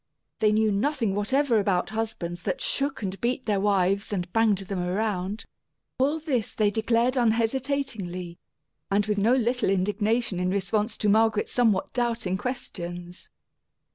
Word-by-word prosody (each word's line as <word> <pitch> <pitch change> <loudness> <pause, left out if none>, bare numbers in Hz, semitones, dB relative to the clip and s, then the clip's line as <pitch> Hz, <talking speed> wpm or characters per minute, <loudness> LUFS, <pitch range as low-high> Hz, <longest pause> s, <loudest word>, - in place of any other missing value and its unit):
They 215 -1 +4
knew 215 0 +3
nothing 225 0 0
whatever 240 +4 +2
about 195 -2 0
husbands 205 -6 -3
that - - -2
shook 275 -4 -1
and 195 0 -4
beat 255 +2 -1
their 210 -3 +1
wives 200 0 +1
and 180 -3 -3
banged 225 -3 +3
them 195 0 -4
around. 190 +2 -2 0.5
All 285 +4 +2
this 270 -9 -2
they 210 -2 +2
declared 230 +4 +1
unhesitatingly, 225 -7 -1 0.5
and 200 +1 +2
with 210 -1 0
no 225 +5 +4
little 245 -3 +1
indignation 205 +2 0
in 180 0 0
response 205 +3 -1
to 210 - -1
Margaret's 220 0 +3
somewhat 225 -6 +2
doubting 235 -6 0
questions. 175 -6 -6
215 Hz, 140 wpm, -26 LUFS, 195-235 Hz, 0.5 s, They